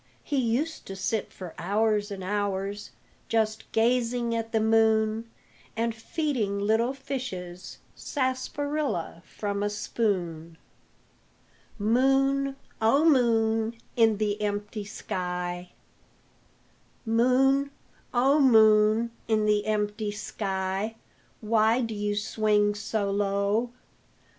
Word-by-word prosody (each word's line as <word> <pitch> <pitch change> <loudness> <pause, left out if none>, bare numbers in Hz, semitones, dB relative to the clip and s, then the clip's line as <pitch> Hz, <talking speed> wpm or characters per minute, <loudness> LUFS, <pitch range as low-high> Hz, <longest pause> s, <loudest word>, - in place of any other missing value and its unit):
He 290 - -2
used 260 +7 -1
to 195 - -6
sit 200 +3 -2
for 180 -3 -9
hours 210 +3 +1
and 195 -2 -6
hours 200 +1 -2 0.4
Just 220 -1 -1
gazing 235 0 +1
at 225 0 -3
the 225 - +2
moon, 220 0 +2 0.5
And 230 0 0
feeding 225 -3 -2
little 220 +4 +2
fishes 230 -10 -6 0.2
Sarsaparilla 265 - -2
from 200 -1 -3
a 205 - +1
spoon. 180 -6 -2 1.2
MOON, 270 +5 +2 0.3
O 275 +8 +4
MOON 225 -5 +3 0.2
IN 225 -3 +4
THE 210 0 -1
EMPTY 205 0 -3
SKY 180 -2 -4 1.4
Moon, 260 +5 +3 0.4
O 270 +4 +3
Moon 220 -2 +5 0.2
in 215 -1 +2
the 210 0 +2
empty 210 0 -1
sky, 200 0 -3 0.5
Why 220 +2 +3
do 230 -3 -2
you 205 0 -2
swing 210 0 +1
so 210 -1 -2
low? 200 +3 0
220 Hz, 100 wpm, -27 LUFS, 205-235 Hz, 1.4 s, Moon